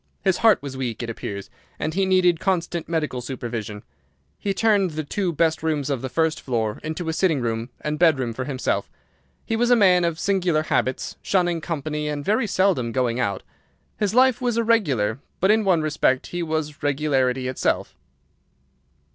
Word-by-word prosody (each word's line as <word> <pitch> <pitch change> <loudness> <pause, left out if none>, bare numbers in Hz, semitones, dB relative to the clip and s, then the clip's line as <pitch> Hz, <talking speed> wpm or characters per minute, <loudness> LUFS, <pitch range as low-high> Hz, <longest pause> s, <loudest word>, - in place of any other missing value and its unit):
His 190 -2 +2
heart 220 -9 +4
was 140 -2 -6
weak, 125 -3 -3
it 115 - -3
appears, 100 -3 -6 0.3
and 155 - -2
he 190 +2 +1
needed 180 -3 +3
constant 170 -3 -1
medical 155 -7 -1
supervision. 115 -4 -5 0.6
He 200 - -1
turned 200 -2 +2
the 155 -1 -4
two 185 +4 -1
best 160 0 +1
rooms 150 -3 -1
of 135 -4 -1
the 130 - -4
first 160 +2 0
floor 110 -4 -2
into 160 +2 -4
a 160 - 0
sitting 165 -4 +2
room 115 0 -2
and 150 0 -3
bedroom 135 -9 +3
for 130 +2 -4
himself. 130 -2 -2 0.6
He 225 - -1
was 240 +2 +1
a 245 - +7
man 185 -5 +5
of 170 -2 0
singular 180 -6 +1
habits, 130 -4 -1
shunning 175 -3 +1
company 150 -2 -3
and 145 -1 -3
very 215 +4 +1
seldom 185 - +1
going 125 -1 0
out. 100 -4 -1 0.6
His 210 +1 0
life 255 -1 +4
was 240 -2 0
irregular, 145 - +1 0.2
but 190 +3 +4
in 220 0 +3
one 180 -5 +2
respect 145 -3 +1
he 175 - -4
was 155 -3 -3
regularity 135 -3 +1
itself. 130 - -1
155 Hz, 175 wpm, -23 LUFS, 130-185 Hz, 0.6 s, a